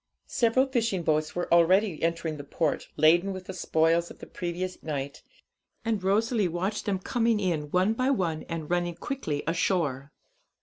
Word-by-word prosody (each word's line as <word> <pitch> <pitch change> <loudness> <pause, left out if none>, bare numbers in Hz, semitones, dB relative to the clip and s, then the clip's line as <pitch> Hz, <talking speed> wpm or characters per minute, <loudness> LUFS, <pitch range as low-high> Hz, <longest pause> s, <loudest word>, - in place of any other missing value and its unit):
Several 250 +1 +2
fishing 230 -9 0
boats 155 -1 0
were 175 - -1
already 180 +1 +4
entering 165 -1 -1
the 145 - -7
port, 150 +2 -1
laden 170 +5 +4
with 185 -1 -8
the 190 - -6
spoils 165 -1 +1
of - - -12
the - - -10
previous 180 +1 -4
night, 140 -3 -4 0.6
and 220 -3 0
Rosalie 215 +2 +2
watched 185 +5 -2
them 200 -2 +1
coming 230 +3 +1
in 165 -7 -1
one 185 +6 +2
by 255 +3 0
one 175 - 0
and 165 -2 -4
running 175 0 0
quickly 165 - -3
ashore. 160 -5 0
175 Hz, 165 wpm, -27 LUFS, 160-205 Hz, 0.6 s, already